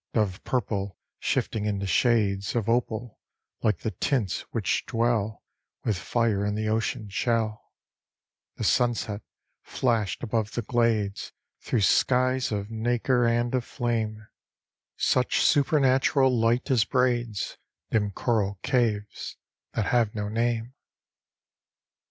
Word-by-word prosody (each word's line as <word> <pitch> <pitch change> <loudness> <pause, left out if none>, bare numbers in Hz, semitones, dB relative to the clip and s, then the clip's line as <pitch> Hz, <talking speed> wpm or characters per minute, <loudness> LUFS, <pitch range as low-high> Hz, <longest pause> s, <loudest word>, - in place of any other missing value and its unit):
Dove 105 -4 0
purple 100 -6 -2 0.2
shifting 105 -2 -1
into 100 -2 -1
shades 100 -2 +2
Of 115 -4 0
opal, 120 -1 -1 0.4
like 105 - +1
the 110 - -2
tints 120 -9 -1
which - - 0
dwell 115 -2 0 0.4
With 110 - +1
fire 105 +2 0
in 105 0 -1
the 110 0 -2
ocean 110 0 -1
shell, 110 +1 -1 0.8
The - - -5
sunset 115 -4 +1 0.4
flashed 115 -6 -1
above 110 -2 -1
the 120 - -2
glades 110 -3 0 0.3
Through 120 - 0
skies 130 +4 +3
of 105 0 -3
nacre 120 +2 +1
and 120 +1 +1
of 130 -2 +1
flame; 110 -3 -2 0.7
Such 125 -1 +2
supernatural 135 -2 +3
light 120 +4 +1
as 120 -4 +4
braids 120 -3 0 0.3
Dim 105 -2 +2
coral 100 -1 0
caves, 110 -6 -1 0.4
that 110 - 0
have 115 -2 +1
no 105 -1 -2
name. 115 +2 -1
115 Hz, 115 wpm, -26 LUFS, 105-120 Hz, 0.8 s, as